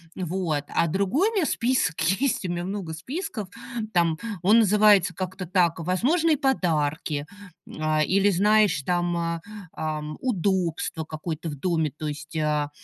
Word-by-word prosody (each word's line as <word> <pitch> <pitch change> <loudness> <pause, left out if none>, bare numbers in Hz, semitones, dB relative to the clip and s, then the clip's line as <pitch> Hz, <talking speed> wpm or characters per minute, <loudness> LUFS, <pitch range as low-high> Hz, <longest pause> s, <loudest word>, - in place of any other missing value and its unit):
Вот, 175 -4 -2
а 170 - +1
другой 200 - +1
у 455 - -8
меня 370 -6 +2
список 235 - 0 0.2
есть, 265 -8 0
у - - -2
меня 175 0 -3
много 190 -3 -4
списков. 215 - -5 0.4
Там 170 -2 +2 0.3
он 215 +5 +6
называется 205 -3 +5
как-то 185 0 -5
так: 175 -2 +2
"возможные 285 - +2
подарки", 155 - 0 0.4
э, 155 0 0
или, 195 +2 +3
знаешь, 205 -3 +3
там, 175 0 0
э, 170 0 -2 0.4
эм, 155 -1 -4
"удобство 185 -8 -1
какое-то 160 +1 -5
в 145 - -5
доме", 160 0 0
то 155 - -5
есть, 150 +1 -7
э, 150 -2 0
175 Hz, 145 wpm, -25 LUFS, 155-205 Hz, 0.4 s, он